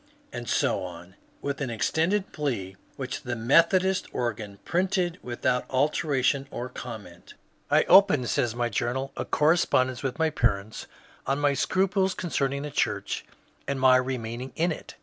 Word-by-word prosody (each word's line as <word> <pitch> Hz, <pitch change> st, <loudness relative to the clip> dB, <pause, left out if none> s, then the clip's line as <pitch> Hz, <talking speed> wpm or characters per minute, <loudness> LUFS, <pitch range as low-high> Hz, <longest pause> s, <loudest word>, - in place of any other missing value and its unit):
And 120 Hz, -2 st, -5 dB
so -, -, +1 dB
on, 90 Hz, 0 st, -9 dB, 0.3 s
with 140 Hz, 0 st, -3 dB
an 135 Hz, -, -1 dB
extended 165 Hz, -, 0 dB
plea 115 Hz, -11 st, -3 dB, 0.2 s
which 130 Hz, -2 st, -5 dB
the 120 Hz, -1 st, -3 dB
Methodist 170 Hz, -, +3 dB
organ 110 Hz, -4 st, -3 dB
printed 180 Hz, 0 st, 0 dB
without 125 Hz, +1 st, -1 dB
alteration 140 Hz, -1 st, +1 dB
or 125 Hz, -2 st, -5 dB
comment. 110 Hz, -9 st, -9 dB, 0.2 s
" -, -, -39 dB
I -, -, +4 dB
opened," 185 Hz, -10 st, +5 dB
says 120 Hz, -2 st, 0 dB
my 120 Hz, 0 st, 0 dB
journal, 120 Hz, +4 st, -2 dB
" -, -, -38 dB
a -, -, -3 dB
correspondence 130 Hz, -5 st, +2 dB
with 135 Hz, -1 st, -3 dB
my 160 Hz, -1 st, +1 dB
parents 110 Hz, -6 st, -1 dB, 0.4 s
on 135 Hz, +1 st, +1 dB
my 145 Hz, -1 st, +3 dB
scruples 190 Hz, +5 st, +1 dB
concerning 140 Hz, -5 st, -1 dB
the 150 Hz, -, -5 dB
church -, -, -1 dB, 0.4 s
and 140 Hz, -1 st, -2 dB
my 130 Hz, 0 st, +6 dB
remain 125 Hz, -2 st, -3 dB
ing 130 Hz, -, -7 dB
in 170 Hz, +2 st, +1 dB
it. -, -, -8 dB
130 Hz, 160 wpm, -26 LUFS, 120-160 Hz, 0.4 s, my